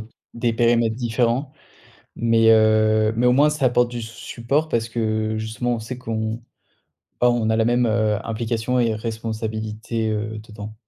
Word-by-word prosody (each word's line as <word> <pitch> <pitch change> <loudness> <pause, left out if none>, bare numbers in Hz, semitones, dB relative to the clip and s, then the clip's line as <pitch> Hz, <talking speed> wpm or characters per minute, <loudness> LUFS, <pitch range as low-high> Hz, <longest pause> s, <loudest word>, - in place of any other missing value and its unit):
d 110 - -10 0.3
des 115 0 0
périmètres 115 -1 +2
différents. 120 +3 -1 0.6
Mais, 115 -1 +3
heu, 110 0 +4
mais 120 - +2
au 125 - +5
moins, 145 +4 +5
ça 150 -3 -1
apporte 120 -1 +2
du 120 - -4
s 115 - -5
support 125 +6 -2
parce 115 -4 0
que, 110 -1 -1
justement, 110 +3 -2
on - - -5
sait 115 +3 -7
qu'on, 110 -1 -3 0.8
bah, 125 - +5
on 120 -2 0
a 110 - +2
la 110 - +2
même, 120 +1 +2
heu, 110 -1 +1
implication 115 +2 -1
et 115 -2 +1
responsabilité, 110 0 -4
heu, 110 +1 -3
dedans. 105 -1 -9
115 Hz, 170 wpm, -22 LUFS, 110-120 Hz, 0.8 s, au